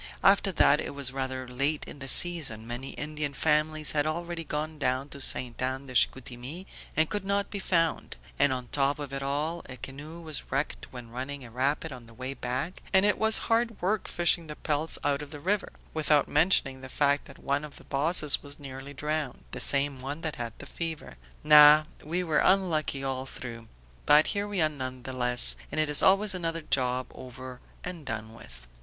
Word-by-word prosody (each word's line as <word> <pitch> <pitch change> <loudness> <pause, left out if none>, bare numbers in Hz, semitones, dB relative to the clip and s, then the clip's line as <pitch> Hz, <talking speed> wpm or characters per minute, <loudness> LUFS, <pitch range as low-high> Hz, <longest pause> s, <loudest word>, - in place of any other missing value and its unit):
After 195 0 +4
that 150 -2 +4
it - - -6
was 140 -2 -2
rather 130 -1 -4
late 140 +5 -1
in - - -10
the 135 - -7
season; 140 -9 +1
many 120 +3 -6
Indian 150 -2 -5
families 155 0 +2
had 150 0 0
already 170 +1 -4
gone 155 0 -4
down 130 0 -1
to 140 - -7
Ste. 125 -2 +2
Anne 130 +1 -2
de 130 - -10
Chicoutimi 125 +7 -1 0.3
and 160 0 +3
could 205 +2 -3
not 200 +1 -1
be 200 - -4
found; 165 -4 0 0.2
and 145 -1 +4
on 125 -2 -4
top 140 0 +1
of 145 -2 -7
it 135 - -3
all 150 +5 -2
a 130 - -8
canoe 145 +7 -9
was 160 -3 -7
wrecked 140 +2 -3
when 125 -2 -10
running 130 +2 -6
a 115 - -12
rapid 140 +5 -1
on 120 -2 -11
the 115 - -16
way 130 +2 -5
back, 135 +7 -4
and 190 0 +4
it 205 - +1
was 220 0 +5
hard 230 -1 +1
work 200 +3 -1
fishing 170 -1 +1
the 150 - -6
pelts 155 +1 +1
out 145 0 0
of 150 - -8
the 145 0 -9
river, 200 +6 -1 0.2
without 150 -2 +2
mentioning 145 -4 +2
the 130 - -9
fact 145 +1 +1
that 140 - -14
one 140 +1 -2
of 150 -1 -9
the - - -14
bosses 150 +1 +3
was 145 0 -4
nearly 140 0 -9
drowned, 150 -2 -3
the - - -5
same 140 -1 +4
one 140 +4 -6
that 160 -3 -4
had 115 -1 -5
the - - -10
fever. 165 0 -6 0.3
No, 150 0 +8 0.2
we 175 +4 -2
were 160 -3 +1
unlucky 160 -7 +1
all 135 0 -3
through. 115 -3 -8 0.4
But 150 +1 +6
here 205 0 -2
we 200 -5 0
are - - +4
none 130 -4 -6
the 130 - -6
less, 125 -1 +8 0.2
and 155 - -2
it 155 -1 +1
is 150 - +4
always 195 +1 +4
another 165 -2 -3
job 130 -3 0
over 130 0 -10 0.2
and 180 -3 -7
done 110 -3 -6
with." 60 - -13
145 Hz, 205 wpm, -28 LUFS, 130-160 Hz, 0.4 s, No